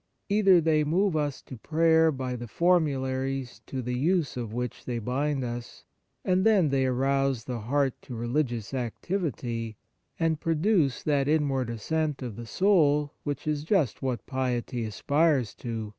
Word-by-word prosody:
Either 200 -3 +5
they 155 -2 +2
move 175 +4 +1
us 145 -3 -1
to 130 - -9
prayer 160 +4 +3
by 130 -3 -3
the 120 0 -6
for 175 +9 +3
mularies 135 -3 -3
to 130 -1 -4
the 125 +1 -3
use 155 +4 +1
of 120 -4 -4
which 125 0 -4
they 120 -2 -2
bind 135 +4 -1
us, 120 0 -6 0.4
and 185 0 +2
then 200 -8 +4
they 135 -1 +2
arouse 135 -1 +1
the 125 -1 -4
heart 135 +4 +1
to 125 - -8
religious 120 -1 -2
activity, 120 - -3 0.4
and 165 -2 +1
pro 165 0 0
duce 160 - +2
that 140 -2 +1
inward 140 -5 +1
ascent 150 +5 -2
of 120 -5 -5
the 115 +1 -8
soul 150 - +3
which 145 -1 -4
is 150 -1 -1
just 160 - +1
what 130 -3 -2
piety 125 -2 -2
aspires 140 +2 +1
to. 115 -3 -5
135 Hz, 160 wpm, -27 LUFS, 125-160 Hz, 0.4 s, Either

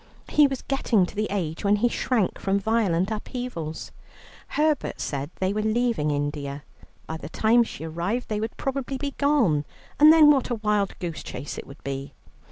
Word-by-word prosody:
He 295 -1 +5
was 270 -2 -5
getting 235 -8 +2
to - - -11
the 215 +1 0
age 170 -6 -3
when 200 0 +4
he 220 +4 +2
shrank 235 -4 0
from 195 +1 +1
violent 200 -3 +1
upheavals. 215 - -5 0.6
Herbert 300 -1 0
said 140 0 -3
they 190 +1 -1
were 215 - -1
leaving 220 -7 +1
India. 145 -1 -3 0.4
By 160 - -5
the 145 - -8
time 225 +7 +3
she 225 - -8
arrived 170 +9 -2
they 210 -1 -2
would 220 +1 -4
probably 270 0 -3
be 280 +1 -3
gone, 245 - +3 0.4
and 305 +1 +9
then 310 -2 +8
what 270 -3 +2
a 240 - 0
wild 210 -2 0
goose 170 -3 -5
chase 145 - -6
it - - -9
would 140 +2 -13
be. 135 0 -5
210 Hz, 180 wpm, -25 LUFS, 160-250 Hz, 0.6 s, and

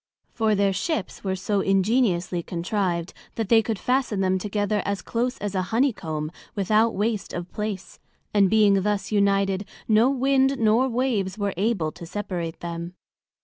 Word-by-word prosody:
For, 220 -2 +1
their 200 -1 +2
Ships 230 - -3
were 190 -1 -1
so 200 +1 0
ingeniously 195 -3 +1
contrived, 175 0 -2 0.2
that 225 -3 -2
they 225 -1 +6
could 225 -1 -2
fasten 250 -1 0
them 190 -1 +1
together 205 +1 -1
as 200 -1 -3
close 245 +2 -1
as 205 -1 -4
a 190 - +1
Honey 250 +3 +2
comb, 155 -4 -4 0.2
without 215 +3 +2
waste 210 0 -1
of 175 0 -5
place; 210 -3 -5 0.3
and 200 -2 +4
being 205 -2 +4
thus 205 0 -1
united, 200 -1 +2 0.2
no 225 +3 +5
Wind 270 0 +2
nor 230 +3 +3
Waves 230 -6 -1
were 200 -2 -1
able 190 -5 0
to 170 - -10
separate 180 -4 -4
them. 170 +1 -5
205 Hz, 160 wpm, -24 LUFS, 185-225 Hz, 0.3 s, they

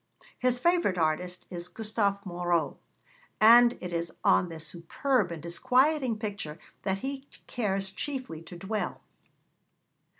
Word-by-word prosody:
His 250 -1 +2
favourite 340 - +2
artist 175 +3 -1
is 175 -1 -6
Gustave 205 0 -1
Moreau, 175 -2 0 0.6
and 235 +2 +7
it 180 -1 -6
is 170 -1 -2
on 180 - +4
this 160 -1 -5
superb 180 - 0
and 160 -3 -6
disquieting 255 - +2
picture 200 -8 -5 0.2
that 190 -1 -1
he 275 0 -5 0.2
cares 195 -5 -1
chiefly 255 - -5
to 165 +2 -11
dwell. 205 +4 -3
195 Hz, 125 wpm, -29 LUFS, 175-245 Hz, 0.6 s, and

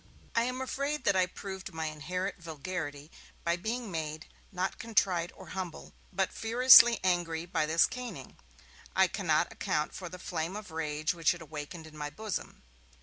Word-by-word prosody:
I 230 - +3
am 255 +1 -2
afraid 280 +3 -2
that 200 - +3
I 185 -1 +4
proved 190 -1 -7
my 160 0 -2
inherent 180 +5 -3
vulgarity 155 -2 -5 0.3
by 170 0 +2
being 220 +4 -3
made, 155 -1 -4 0.3
not 185 0 -2
contrite 185 -7 +1
or - - -12
humble, 185 -3 -6 0.2
but 190 0 0
furiously 240 0 +8
angry 175 -3 +1
by 155 -3 0
this 165 +2 +5
caning. 250 -1 -7 0.6
I 190 - +6
cannot 175 -5 +1
account 150 0 -1
for 180 -2 -6
the 180 - -8
flame 175 0 -3
of 210 -3 -7
rage 155 0 -1
which 170 0 +2
it 175 - -11
awakened 155 +1 -7
in 155 -1 -13
my 150 -1 -4
bosom. 215 +6 -5
180 Hz, 165 wpm, -31 LUFS, 160-200 Hz, 0.6 s, furiously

